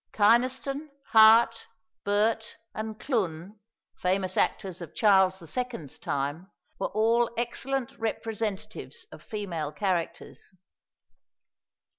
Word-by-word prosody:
Kynaston, 255 +7 +2 0.2
Hart, 225 +1 +6 0.4
Burt, 220 +2 0 0.2
and 215 0 -5
Clun, 200 - -2 0.4
famous 185 0 0
actors 185 -3 0
of 170 - -9
Charles 190 -3 +4 0.2
II.'s 245 - -4
time, 145 +7 -3 0.3
were - - 0
all 230 +2 +2
excellent 250 +2 -2
representatives 225 - -4
of - - -12
female 180 - -4
characters. 180 +1 -3
215 Hz, 90 wpm, -28 LUFS, 185-230 Hz, 0.4 s, Hart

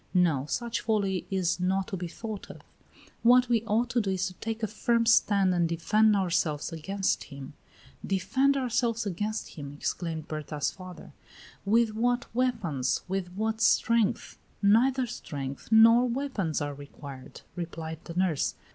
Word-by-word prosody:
No; 160 -7 +2
such 235 +6 -2
folly 200 -4 0
is 185 -2 0
not 190 +1 0
to - - -3
be 180 -1 -4
thought 215 +3 -7
of. - - -11 0.6
What 250 +1 +6
we 230 -2 +2
ought 230 +3 +1
to 240 - +2
do 200 - -2
is 185 -1 0
to 190 - -4
take 225 +4 -5
a - - +2
firm 230 +2 +1
stand 200 -4 +4
and 170 -2 +1
defend 210 +6 +3
ourselves 170 -5 0
against 195 +5 -1
him." 140 -1 -10 0.5
"Defend 260 +9 +1
ourselves 235 -3 0
against 210 +3 -3
him!" 140 -3 -8
exclaimed 160 -1 -3
Berta's 150 -1 -3
father. 185 -1 -11 0.5
"With 225 +2 +3
what 245 +3 0
weapons? 195 - 0
With 185 -1 -3
what 220 +3 -2
strength?" 230 -2 +2 0.2
"Neither 250 +6 +4
strength 140 - -7
nor 230 +3 +7
weapons 235 - -2
are 145 0 -2
required," 140 -1 -11
replied 165 -2 -5
the 165 - -8
nurse. 180 -5 0
195 Hz, 150 wpm, -28 LUFS, 165-230 Hz, 0.6 s, nor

